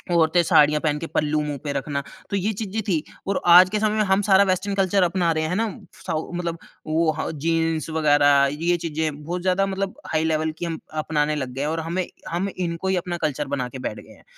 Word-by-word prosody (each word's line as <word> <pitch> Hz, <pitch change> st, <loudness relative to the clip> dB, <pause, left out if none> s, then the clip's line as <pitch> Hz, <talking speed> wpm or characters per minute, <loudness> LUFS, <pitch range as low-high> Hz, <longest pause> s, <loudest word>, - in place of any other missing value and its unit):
औरतें 170 Hz, +1 st, +4 dB
साड़ियाँ 150 Hz, -1 st, +4 dB
पहन 150 Hz, -2 st, 0 dB
के 165 Hz, -, -5 dB
पल्लू 150 Hz, 0 st, 0 dB
मुँह 145 Hz, -1 st, -3 dB
पे 145 Hz, -, -2 dB
रखना। 140 Hz, +1 st, -2 dB, 0.3 s
तो 200 Hz, -, -2 dB
ये 200 Hz, +3 st, 0 dB
चीज़ें 215 Hz, +1 st, -3 dB
थी 165 Hz, -6 st, +1 dB, 0.2 s
और 200 Hz, -, 0 dB
आज 180 Hz, +2 st, +9 dB
के 210 Hz, +2 st, -1 dB
समय 215 Hz, 0 st, +1 dB
में 215 Hz, -, +3 dB
हम 190 Hz, +1 st, +2 dB
सारा 195 Hz, -1 st, +5 dB
वेस्टर्न 190 Hz, +2 st, 0 dB
कल्चर 195 Hz, 0 st, +2 dB
अपना 175 Hz, -1 st, +1 dB
रहे 155 Hz, 0 st, -1 dB
हैं 155 Hz, -, -2 dB
है 180 Hz, -, -1 dB
ना। 225 Hz, +2 st, +1 dB, 0.3 s
साऊ 160 Hz, -2 st, -4 dB
मतलब 170 Hz, -1 st, -3 dB, 0.3 s
वो 160 Hz, +1 st, +2 dB
ह -, -, -2 dB, 0.2 s
जीन्स 165 Hz, -1 st, 0 dB
वगैरह 145 Hz, -3 st, +4 dB
ये 170 Hz, +4 st, 0 dB
चीज़ें 155 Hz, -2 st, -3 dB
बहुत 175 Hz, +3 st, -4 dB
ज़्यादा 185 Hz, +2 st, +2 dB
मतलब 195 Hz, +2 st, -3 dB, 0.2 s
हाई 160 Hz, 0 st, +1 dB
लेवल 160 Hz, 0 st, 0 dB
की 175 Hz, -, -2 dB
हम 165 Hz, -1 st, -4 dB, 0.2 s
अपनाने 150 Hz, -1 st, 0 dB
लग 130 Hz, -4 st, -3 dB
गए 135 Hz, -, -4 dB
हैं, 145 Hz, -, 0 dB
और 165 Hz, +1 st, -1 dB
हमें 170 Hz, +3 st, -2 dB, 0.2 s
हम 175 Hz, +4 st, -1 dB
इनको 175 Hz, 0 st, -3 dB
ही 190 Hz, -, +2 dB
अपना 175 Hz, 0 st, -3 dB
कल्चर 145 Hz, -1 st, -1 dB
बना 135 Hz, -3 st, -2 dB
के 130 Hz, +1 st, -8 dB
बैठ 105 Hz, -, -4 dB
गए -, -, -14 dB
हैं -, -, -21 dB
165 Hz, 240 wpm, -23 LUFS, 150-185 Hz, 0.3 s, आज